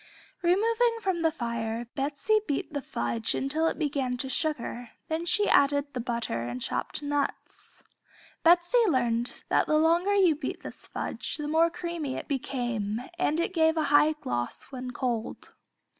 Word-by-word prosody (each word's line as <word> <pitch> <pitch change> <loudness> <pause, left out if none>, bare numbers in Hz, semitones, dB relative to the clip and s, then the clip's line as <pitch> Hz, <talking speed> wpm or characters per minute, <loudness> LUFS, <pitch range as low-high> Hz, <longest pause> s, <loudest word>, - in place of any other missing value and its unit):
Removing 455 +6 +3
from 380 -6 -1
the 325 - +4
fire, 235 -2 -3
Betsey 285 +10 +1
beat 285 +1 -2
the 285 - -2
fudge 120 - -1
until 310 +4 0
it - - -1
began 275 -5 -1
to 265 +2 -4
sugar, 250 -4 -2 0.2
then 325 +2 -2
she 415 +4 +3
added 285 0 +3
the 250 - -3
butter 235 - -2
and 120 +1 -4
chopped 295 - -3
nuts. 290 0 -4 0.6
Betsey 350 +8 +5
learned 240 -6 0
that - - +3
the 305 - +3
longer 340 +6 +3
you 370 -5 +5
beat 295 -2 -5
this - - -9
fudge - - -4
the 300 -1 -4
more 325 +2 +4
creamy 335 -5 -4
it - - -6
became 240 -6 -2 0.2
and 325 -3 +1
it 345 - -1
gave 320 -1 +3
a 315 - +2
high 300 +2 +6
gloss 120 - -4
when 255 -1 -5
cold. 240 -3 -3
290 Hz, 160 wpm, -28 LUFS, 245-335 Hz, 0.6 s, high